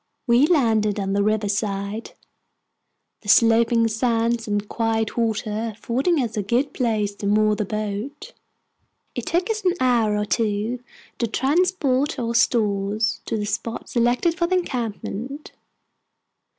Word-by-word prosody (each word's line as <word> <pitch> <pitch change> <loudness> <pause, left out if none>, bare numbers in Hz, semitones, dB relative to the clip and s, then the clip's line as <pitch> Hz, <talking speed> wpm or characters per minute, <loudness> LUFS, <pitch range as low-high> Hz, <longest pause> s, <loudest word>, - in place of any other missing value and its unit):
We 245 +3 +4
landed 220 - +2
on 195 -1 -1
the 200 - +2
river 215 0 +1
side, 200 +1 -3 1.1
the 205 - -8
sloping 230 +1 +5
sands 230 0 0
and 205 0 -1
quiet 225 -1 -1
water 220 -1 -1
affording 260 +10 0
us 225 -1 -4
a 210 - 0
good 240 +8 0
place 215 -5 0
to 200 - -3
moor 215 +1 +3
the 210 - -2
boat. 215 +7 -5 0.8
It - - -5
took 345 +3 +1
us 435 -1 -3
an 365 -1 +2
hour 235 -5 +2
or 210 - 0
two 215 +2 -1 0.4
to 235 - +1
transport 290 - +1
our 235 -1 -2
stores 215 -1 +1
to 225 - -2
the 210 - -2
spot 215 +2 -4
selected 245 +8 +2
for 340 -1 0
the 370 - +1
encampment. 255 - -4
225 Hz, 140 wpm, -23 LUFS, 210-250 Hz, 1.1 s, sloping